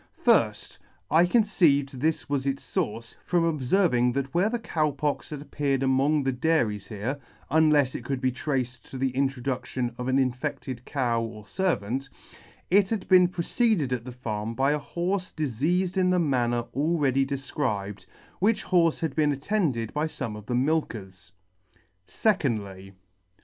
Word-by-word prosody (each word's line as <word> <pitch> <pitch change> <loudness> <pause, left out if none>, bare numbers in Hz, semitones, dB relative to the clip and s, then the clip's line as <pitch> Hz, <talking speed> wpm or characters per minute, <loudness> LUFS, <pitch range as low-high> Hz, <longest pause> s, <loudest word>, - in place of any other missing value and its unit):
Firfh - - +2 0.3
I 165 +3 +5
conceived 160 - +2
this 155 +3 0
was 140 -1 -1
its 135 0 -2
fource, 115 +2 -3
from 175 -1 +1
obferving 140 -5 +2
that 135 -1 -2
where 185 +5 +3
the 240 - -1
Cow 160 -9 0
Pox 145 +1 -2
had 145 -2 -6
appeared 140 -3 -1
among 135 +3 +2
the 135 - +1
dairies 125 -7 0
here 115 +6 -4 0.3
(unlefs 150 -4 +4
it - - -5
could 135 +1 -2
be 130 0 +1
traced 125 -3 -3
to 135 - -7
the 130 0 0
introduction 130 -2 -2
of 125 - -3
an 130 +1 +2
infected 130 -1 -2
cow 120 -5 0
or 110 -2 -7
fer 190 - +1
vant) 125 +7 -4 0.6
it 195 0 +5
had 220 -4 -2
been 180 -1 +7
preceded 175 - 0
at 120 -2 -2
the 125 - -7
farm 115 -2 -4
by 135 +3 +2
a 150 - +1
horfe 180 +4 -3
difeafed 160 - 0
in 185 -1 +3
the 180 - +3
manner 120 -7 +1
already 140 -2 +2
defcribed, 135 -7 -3 0.3
which 215 +4 +1
horfe 170 -3 +2
had 160 -5 -2
been 150 -2 +3
attended 140 - -1
by 150 +2 0
fome 115 -8 -5
of 105 0 -10
the 125 - -1
milkers. 120 - -2 0.8
Secondly. 105 - -1
140 Hz, 160 wpm, -26 LUFS, 125-160 Hz, 0.8 s, been